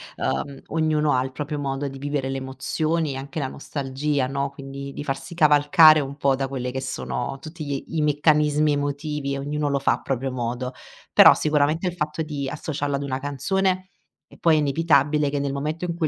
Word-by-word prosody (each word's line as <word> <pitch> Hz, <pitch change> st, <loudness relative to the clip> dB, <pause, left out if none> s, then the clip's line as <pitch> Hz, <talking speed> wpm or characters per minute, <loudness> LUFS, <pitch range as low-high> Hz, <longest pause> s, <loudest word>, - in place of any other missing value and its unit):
ehm, 140 Hz, -1 st, -3 dB
ognuno 155 Hz, -2 st, +1 dB
ha 130 Hz, 0 st, +2 dB
il 130 Hz, -, -5 dB
proprio 150 Hz, +2 st, -4 dB
modo 140 Hz, 0 st, -2 dB
di 135 Hz, -, -7 dB
vivere 140 Hz, -1 st, -2 dB
le 135 Hz, -, -2 dB
emozioni 150 Hz, +4 st, -2 dB
e 135 Hz, -, -5 dB
anche 140 Hz, +3 st, -6 dB
la 135 Hz, -, -1 dB
nostalgia, 140 Hz, 0 st, -2 dB
no. 140 Hz, +1 st, -2 dB
Quindi 140 Hz, 0 st, -8 dB
di -, -, -6 dB
farsi 135 Hz, +3 st, -5 dB
cavalcare 155 Hz, 0 st, +6 dB
un 140 Hz, 0 st, -5 dB
po' 140 Hz, -2 st, +2 dB
da 135 Hz, 0 st, -2 dB
quelle 125 Hz, -2 st, -4 dB
che 130 Hz, +1 st, -4 dB
sono 130 Hz, 0 st, -4 dB
tutti 155 Hz, +3 st, -8 dB
gli 140 Hz, -1 st, -3 dB, 0.2 s
i -, -, +2 dB
meccanismi 150 Hz, 0 st, +3 dB
emotivi, 145 Hz, -1 st, -2 dB
ognuno 145 Hz, +1 st, -2 dB
lo 140 Hz, -1 st, +1 dB
fa 140 Hz, -, +2 dB
a -, -, -5 dB
proprio 135 Hz, 0 st, -2 dB
modo. 125 Hz, +1 st, -3 dB, 0.4 s
Però -, -, +9 dB
sicuramente 155 Hz, +3 st, +1 dB
il 175 Hz, -, -2 dB
fatto 155 Hz, -1 st, -2 dB
di 145 Hz, -3 st, -4 dB
associarlo 145 Hz, -1 st, -3 dB
ad 140 Hz, -, -3 dB
una 130 Hz, -2 st, -3 dB
canzone 185 Hz, +7 st, -1 dB, 0.4 s
e -, -, -15 dB
poi 165 Hz, -2 st, +4 dB
è 155 Hz, -, +3 dB
inevitabile 150 Hz, 0 st, +2 dB
che 145 Hz, -, -2 dB
nel 140 Hz, -1 st, -1 dB
momento 150 Hz, +4 st, -3 dB
in 175 Hz, -1 st, -1 dB
cui 165 Hz, -2 st, 0 dB
145 Hz, 200 wpm, -24 LUFS, 135-150 Hz, 0.4 s, Però